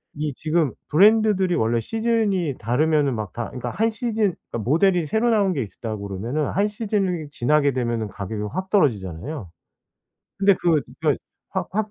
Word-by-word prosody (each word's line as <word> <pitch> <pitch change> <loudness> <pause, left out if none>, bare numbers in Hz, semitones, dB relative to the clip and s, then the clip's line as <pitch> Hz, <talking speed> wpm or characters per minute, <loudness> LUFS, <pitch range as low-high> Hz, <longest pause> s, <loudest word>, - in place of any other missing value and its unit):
이 150 -1 -2
지금 155 -4 0 0.2
브랜드들이 200 0 +5
원래 115 -4 +1
시즌이 215 - 0
다르면은 140 +4 +2
막 105 -4 -5
다 120 -1 -4
그니까 125 - -5
1 225 +1 +1
시즌 220 -5 0 0.2
그니까 - - -3
모델이 175 +2 +3
새로 220 +7 +1
나온 200 -4 +3
게 135 -6 -1
있으 105 - -12
다 110 -2 -3
그러면은 105 +9 -3
1 200 +3 +1
시즌이 200 -7 -2
지나게 145 +2 +2
되면은 120 -3 -1
가격이 105 +2 -5
확 185 +1 -3
떨어지잖아요. 110 - 0 0.9
근데 200 0 +5
그 165 -4 +3 0.2
그니까 - - +2 0.3
확 - - -2
확 215 +1 -1
155 Hz, 350 characters per minute, -23 LUFS, 120-200 Hz, 0.9 s, 브랜드들이